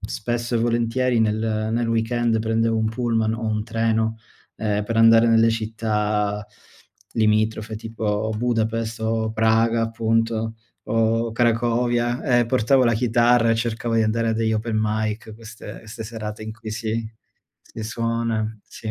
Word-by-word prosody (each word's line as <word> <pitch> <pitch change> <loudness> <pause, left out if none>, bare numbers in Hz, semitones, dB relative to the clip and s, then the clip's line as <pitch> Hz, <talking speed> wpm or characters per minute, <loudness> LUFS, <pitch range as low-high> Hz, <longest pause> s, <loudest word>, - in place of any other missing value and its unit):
spesso 120 +3 -2
e - - +1
volentieri 120 +1 +1
nel 110 0 0
nel 120 +1 0
weekend 115 0 +1
prendevo 115 +1 +1
un 110 0 +1
pullman 115 -1 0
o 115 - -6
un 110 -1 -1
treno 110 0 0 0.4
ehm, 105 -1 -1
per 115 +1 -3
andare 115 +1 +6
nelle 115 0 +5
città 105 -2 -1 0.7
limitrofe 110 0 +1
tipo 110 -1 -2
Budapest 115 -1 -1
o 110 0 0
Praga 115 +1 +2
appunto 115 0 0 0.3
o 115 +1 +1
Cracovia 120 +1 +1 0.2
e 120 - +1
portavo 130 +2 +3
la 115 - +3
chitarra 120 0 +3
e 115 - +4
cercavo 115 0 -2
di 115 - +3
andare 115 +1 0
a - - +2
degli 110 0 0
Open 110 0 -1
Mic, 110 +1 -2
queste 110 0 -10
queste 110 0 -8
serate 110 -1 -6
in 110 - -6
cui 110 -1 -9
si 110 0 -3 0.6
si 110 - -9
suona, 115 -1 -2
sì. 110 - -7
115 Hz, 145 wpm, -22 LUFS, 110-115 Hz, 0.7 s, andare